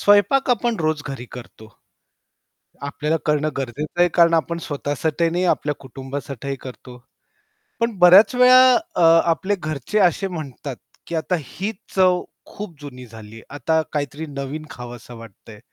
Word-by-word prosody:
स्वयंपाक 205 +7 +4
आपण 240 -1 +1
रोज 155 -1 0
घरी 130 -3 -6
करतो. 115 -3 -11 1.1
आपल्याला 150 +3 -1
करणं 150 0 +1
गरजेचं 140 +6 -4
आहे 175 - +5
कारण 170 -1 +5
आपण 170 +1 0
स्वतःसाठी 145 +3 -1
नाही 175 +2 -1
आपल्या 150 0 -4
कुटुंबासाठीही 135 0 -6
करतो. 125 -1 -11 0.8
पण 230 -3 -1
बऱ्याच 185 +7 +7
वेळा 255 0 +7 0.2
अ, - - 0 0.3
आपले 190 +5 0
घरचे 155 - -2
असे 195 +1 +2
म्हणतात, 145 -6 -7 0.3
की 170 - -4
आता 165 +3 -1
ही 190 - -5 0.2
चव 185 -2 +3 0.2
खूप 200 -5 -9
जुनी 125 -3 -10
झालीये. 110 0 -12
आता 160 +3 0
काहीतरी 145 +1 -3
नवीन 140 +2 -6
खावसं 120 0 -10
वाटतयं. 110 -1 -14
155 Hz, 135 wpm, -21 LUFS, 135-180 Hz, 1.1 s, बऱ्याच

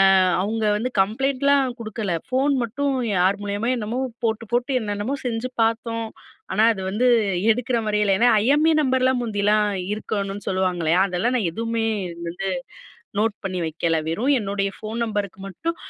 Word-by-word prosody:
அ - - +6 0.3
அவங்க 220 +2 -2
வந்து 250 +4 -2
கம்ப்ளைண்ட்லாம் 270 +4 +1
குடுக்கல. 215 -4 -3
ஃபோன் 270 +2 +2
மட்டும் 275 +4 -1 0.2
யார் 190 +3 +2
மூலியமா 205 +3 -2
என்னமோ 230 +2 -3 0.3
போட்டு, 220 0 -1
போட்டு 245 +3 +1
என்னென்னமோ 205 +5 -2
செஞ்சு 235 +1 -2
பார்த்தோம். 230 0 -1 0.5
ஆனா, 215 - +3
அது 190 - -7
வந்து 215 +6 0 0.5
எடுக்கிற 245 +2 0
மாரி 210 0 +1
இல்ல. 205 -1 +2
ஏனா, 240 - +4
ஐஎம்இ 295 +7 +4
நம்பர்லாம் 260 -2 +2
முந்தியெல்லாம் 210 -2 +2 0.3
இருக்கணும்னு 200 -2 -4
சொல்லுவாங்க 185 -2 0
இல்லையா? 165 +3 +3
அதெல்லாம் 190 +7 0
நான் 220 -8 +1
எதுவுமே 230 +4 -2 0.4
வந்து 180 +3 -3 0.7
நோட் 215 0 +1
பண்ணி 185 -1 -3
வைக்கல. 165 0 0
வெறும் 225 - +1
என்னுடைய 200 -1 -1
ஃபோன் 220 +2 -6
நம்பருக்கு 205 -3 -3
மட்டும், 325 - -4
220 Hz, 150 wpm, -23 LUFS, 200-245 Hz, 0.7 s, அ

